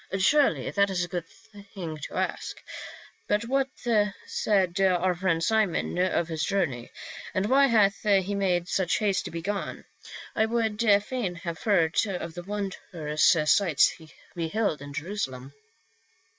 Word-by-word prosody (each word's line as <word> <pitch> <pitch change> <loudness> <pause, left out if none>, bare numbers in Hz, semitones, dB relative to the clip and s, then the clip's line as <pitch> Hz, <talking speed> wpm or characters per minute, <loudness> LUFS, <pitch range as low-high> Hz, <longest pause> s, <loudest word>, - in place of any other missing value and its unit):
" - - -31
Assuredly, 270 +10 +3
that 200 0 +2
is 180 -2 -1
a - - -3
good 175 -2 -4
thing 200 -7 -10
to 150 - -8
ask. - - -3 0.7
But 210 +2 +1
what 270 +2 +1 0.6
said 190 -3 0
our 185 -1 +3
friend 170 -2 0
Simon 205 -3 +1
of 180 -2 +1
his 160 -2 -3
journey? 160 -12 -1 0.5
And 190 - +1
why 275 +5 +5
hath 210 -5 +3
he 200 -2 +2
made 180 -3 0
such 180 -1 +1
haste 205 -3 0
to - - -4
be 165 0 -5
gone? 200 +2 -4 0.5
I 220 0 +2
would 225 -2 -1 0.2
fain 215 -6 -3
have 170 -1 -6
heard 170 -7 +2
of 180 -4 -4
the 175 - -6
wondrous 180 -6 0
sights 155 0 +4
he 160 -2 -13 0.2
beheld 170 -1 -1
in 145 0 -8
Jerusalem." 140 -5 -5
190 Hz, 150 wpm, -27 LUFS, 165-205 Hz, 0.7 s, why